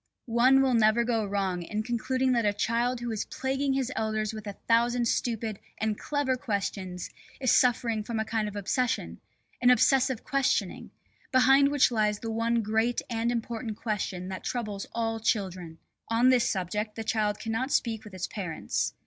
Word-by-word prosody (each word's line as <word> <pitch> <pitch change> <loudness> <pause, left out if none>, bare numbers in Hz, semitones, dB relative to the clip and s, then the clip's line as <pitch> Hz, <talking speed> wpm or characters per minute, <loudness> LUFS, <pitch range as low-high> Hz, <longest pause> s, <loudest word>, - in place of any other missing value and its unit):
One 255 +3 +4
will 260 -2 +2
never 225 0 +4
go 230 -2 0
wrong 195 -3 -1
in 210 +5 -3
concluding 255 +3 0
that 235 -2 +2
a 205 -1 +2
child 235 +4 0
who 240 -1 -3
is 220 - -2
plaguing 270 +1 -1
his 265 -1 -1
elders 215 -1 -1
with 215 -1 -7
a 205 - -4
thousand 235 +1 +3
stupid 225 -3 -1 0.2
and 220 -1 -1
clever 285 +1 -1
questions 195 -7 -3 0.3
is 260 -3 +2
suffering 230 -3 +2
from 225 +1 -3
a 220 - -1
kind 220 -1 -1
of 210 - -7
obsession, 245 +5 -1 0.4
an 250 - +5
obsessive 260 0 +3
questioning, 275 -3 0 0.4
behind 270 +2 +5
which 285 -3 +3
lies 210 -2 +1
the 225 +1 -5
one 230 +1 +1
great 220 +3 0
and 230 +1 0
important 230 -2 -4
question 195 -5 -3
that 190 - -6
troubles 210 -5 -3
all 225 -1 -2
children. 185 -7 -2 0.3
On 235 +3 +4
this 250 -2 +4
subject 210 +3 -2
the 225 - -4
child 215 -2 0
cannot 225 +4 -2
speak 225 -2 0
with 210 -3 -11
its 185 - -2
parents. 180 -6 -3
225 Hz, 175 wpm, -28 LUFS, 210-245 Hz, 0.4 s, an